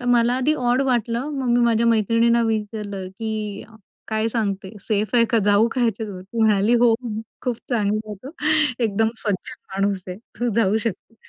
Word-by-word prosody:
तर - - -8
मला 240 0 +3
आधी 270 +4 +2
ऑड 245 -1 +1
वाटलं, 245 0 0
मग 260 -2 -2
मी - - +3
माझ्या 230 0 +2
मैत्रिणींना 230 +1 +3
विचारलं, 210 -3 -3
की 210 +1 -5 0.4
"काय 220 0 0
सांगते. 200 -4 -2
सेफ 210 +2 -1
आहे 235 -1 +6
का? 230 - +4
जाऊ 205 +2 +4
का 260 - -2
याच्या 225 -1 -1
सोबत?" 185 -3 -8
ती 230 - -2
म्हणाली, 215 +1 +4
"हो 235 -2 +5 0.5
खूप 245 -3 -1
चांगलाय 215 -2 0
तो. 270 - -6 0.5
एकदम 220 +1 +1 0.2
सज्जन 205 +4 -2 0.2
माणूस 195 -1 0
आहे. 180 - -6 0.2
तू 245 - +1
जाऊ 215 -2 +3
शकते." 225 +1 -4
220 Hz, 175 wpm, -22 LUFS, 205-235 Hz, 0.5 s, आहे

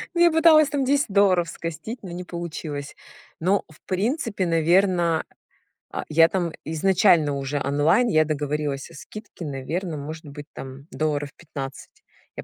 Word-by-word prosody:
Ну, 340 - +2
я 345 -1 +7
пыталась 315 -2 +6
там 285 -2 0
10 285 -1 +2
долларов 185 -4 +4
скостить, 165 +10 -6
но 180 - -7
не 180 +1 -5
получилось. 160 -4 -6 0.4
Но, 190 +4 +2
в 155 - -18
принципе, 205 - -1
наверно, 170 0 +3 0.7
а, - - -3
я 165 +1 +6
там 175 -3 -1
изначально 165 -2 +3
уже 140 +1 -2
онлайн, 155 - +3
я 155 -8 +4
договорилась 150 -2 -2
о - - -15
скидке, 205 +3 -9
наверно, 155 +5 -3
может 155 +2 -7
быть, 145 0 -9
там 135 +1 -9
долларов 150 -2 -1
15. 140 -5 -8 0.4
Я - - -6
165 Hz, 150 wpm, -24 LUFS, 150-195 Hz, 0.7 s, я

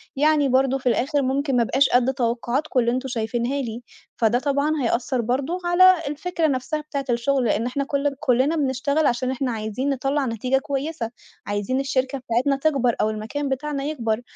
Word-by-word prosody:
يعني 295 0 +3
برضه 265 +1 +2
في 260 -1 0
الآخر 280 +5 +1
ممكن 270 +1 0
ما 240 - +4
أبقاش 270 +4 +2
قد 250 +2 +3
توقعاتكم 250 +3 -1
اللي 235 0 +2
أنتم 255 +2 -2
شايفينها 240 +2 -2
لي 235 -1 -5 0.4
فده 230 +1 +2
طبعًا 285 +2 0
هيأثّر 240 +1 0
برضه 265 +9 -1
على 370 +2 +7
الفكرة 325 +3 -1
نفسها 270 +2 -2
بتاعة 280 -3 -4
الشغل، 245 +2 +1
لأن 225 +1 +1
إحنا 265 +3 -1
كل 280 0 -1
كُلّنا 270 +3 +2
بنشتغل 280 +1 +1
عشان 255 +2 0
إحنا 265 -1 -2
عايزين 220 +4 -3
نطّلع 275 +1 0
نتيجة 250 +3 0
كويسة، 270 -3 -3 0.3
عايزين 205 +6 -1
الشركة 270 0 -1
بتاعتنا 255 +3 0
تكبر، 270 -5 +1
أو 215 - +2
المكان 225 +7 -4
بتاعنا 280 +1 -2
يكبر، 240 -7 -2
265 Hz, 170 wpm, -23 LUFS, 240-285 Hz, 0.4 s, على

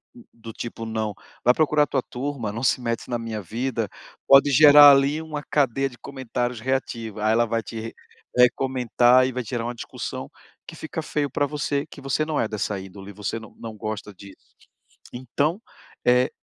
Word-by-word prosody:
hum, 240 - -14
do 115 -1 -11
tipo: 115 -1 -6
"Não, 110 -2 -3 0.3
vai 125 - +5
procurar 150 -1 +2
tua 135 - 0
turma, 125 -4 -4
não 115 +4 -5
se 130 - +2
mete 115 0 -3
na 120 - -1
minha 110 -2 -5
vida", 115 +2 -3 0.4
pode 140 +1 +7
gerar 145 +1 +9
ali 140 +3 +3
uma 155 -2 -5
cadeia 135 -2 +1
de 125 - -16
comentários 125 -3 -4
reativos. 115 -4 -3
Aí 110 - +3
ela 120 +1 +3
vai 115 0 -1
te 115 0 -7 0.4
vai 125 -1 +7
comentar 125 -1 +3
e - - -3
vai 125 0 -4
tirar 115 +1 -4
uma 120 - -3
discussão - - -6 0.4
que - - -9
fica 160 +1 -5
feio 150 -2 -2
pra 145 - 0
você, 145 -1 -2
que - - -13
você 135 +3 0
não 155 -1 -2
é - - +1
dessa 105 -2 -3
índole, 95 +1 -10
você 105 +3 -4
não 110 -2 -14
não 115 -1 -8
gosta 110 -1 -6
disso. 100 +1 -14 0.8
Então, 140 - -1 0.5
eh, 125 +3 +4
125 Hz, 185 wpm, -24 LUFS, 110-140 Hz, 0.8 s, gerar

